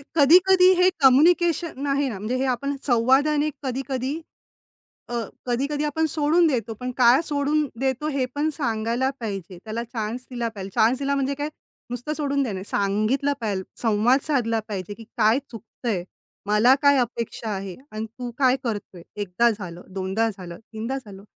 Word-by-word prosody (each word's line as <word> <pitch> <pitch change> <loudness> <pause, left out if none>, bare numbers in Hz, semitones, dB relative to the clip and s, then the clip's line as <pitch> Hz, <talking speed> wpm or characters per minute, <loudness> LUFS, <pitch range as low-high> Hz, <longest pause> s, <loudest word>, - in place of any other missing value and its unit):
कधी-कधी 365 +5 +6
हे 365 +1 +5
कम्युनिकेशन 315 +2 +4
आहे 280 0 +1
ना, 215 - -5
म्हणजे 215 +5 -2
हे 265 - 0
आपण 275 +2 -1
संवादाने 275 +5 +3
कधी-कधी, 265 0 -2 1.0
अ, - - -5 0.3
कधी-कधी 280 +4 -1
आपण 300 +2 0
सोडून 320 +3 +3
देतो 235 -6 -1
पण 250 0 -3
काय 250 +3 +6
सोडून 295 0 0
देतो 265 +2 -1
हे 275 -3 0
पण 300 +2 +1
सांगायला 235 -1 0
पाहिजे. 195 -5 -5
त्याला 225 +1 -4
चान्स 230 0 -4
दिला 240 -2 -2
पाहिजे. 195 -1 -6
चान्स 235 +4 +3
दिला 280 0 0
म्हणजे 275 0 0
काय 290 +2 -3 0.4
नुसतं 245 +5 -3
सोडून 280 -2 0
देणं 235 -6 -3
नाही. 190 0 -5
सांगितलं 215 +8 +1
पाहिजे, 200 -4 -2 0.2
संवाद 225 +3 +3
साधला 235 -6 +1
पाहिजे 200 -2 -5
की 225 - -12
काय 220 +5 +4
चुकतंय. 225 -4 -4 0.4
मला 210 +5 +5
काय 285 -1 +5
अपेक्षा 235 -2 -2
आहे 190 -2 -6 0.2
आणि 215 +1 -4
तू 245 -1 -4
काय 260 -2 +4
करतोय. 205 -6 -5 0.2
1दा 205 +5 +2
झालं, 180 -5 -7
2दा 195 +4 0
झालं, 180 -4 -9 0.2
3दा 230 +5 -3
झालं. 200 -6 -11
250 Hz, 160 wpm, -24 LUFS, 220-280 Hz, 1.0 s, कधी-कधी